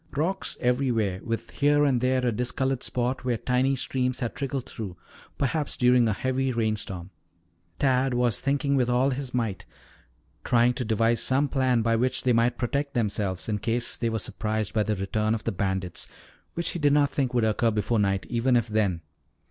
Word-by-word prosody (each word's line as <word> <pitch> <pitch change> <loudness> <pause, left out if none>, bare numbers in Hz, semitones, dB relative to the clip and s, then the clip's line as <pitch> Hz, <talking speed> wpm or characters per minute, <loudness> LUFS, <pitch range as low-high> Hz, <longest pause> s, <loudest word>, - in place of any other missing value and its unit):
Rocks 185 +6 -1
everywhere, 120 -7 0
with 115 -1 -4
here 145 0 +3
and 130 -4 +2
there 130 0 +1
a 120 - +2
discolored 130 +3 -1
spot 125 +2 -2
where 125 -2 0
tiny 130 +3 +1
streams 130 -1 -1
had 120 -3 -2
trickled 135 -2 -3
through, 100 -6 -7 0.4
perhaps 145 +2 -1
during 125 -2 +4
a 110 - +1
heavy 130 +5 -1
rainstorm. 110 -6 -2 0.7
Tad 130 -1 +2
was 120 -2 +1
thinking 140 0 +1
with 125 -2 +2
all 125 +3 +2
his 130 0 -3
might, 115 -6 -2 0.8
trying 120 +1 +3
to 125 - -3
devise 115 +1 +2
some 135 +3 +2
plan 130 -4 +1
by 115 0 +2
which 125 +3 0
they 125 - +3
might 120 +1 +2
protect 140 +3 -2
themselves 100 -5 -1
in 105 -2 -1
case 120 +3 -1
they 115 - -1
were 110 - -1
surprised 110 0 -2
by 110 - +2
the 105 0 0
return 105 +3 0
of 110 - -6
the - - -1
bandits, 95 -2 -2 0.5
which 170 -1 -1
he 175 - -4
did 145 -2 +3
not 145 -1 +3
think 130 -3 -1
would 120 - +3
occur 110 +2 +2
before 110 +1 0
night, 100 -1 +1
even 120 +2 +1
if 120 -2 +2
then. 105 -6 0
120 Hz, 190 wpm, -26 LUFS, 110-130 Hz, 0.8 s, during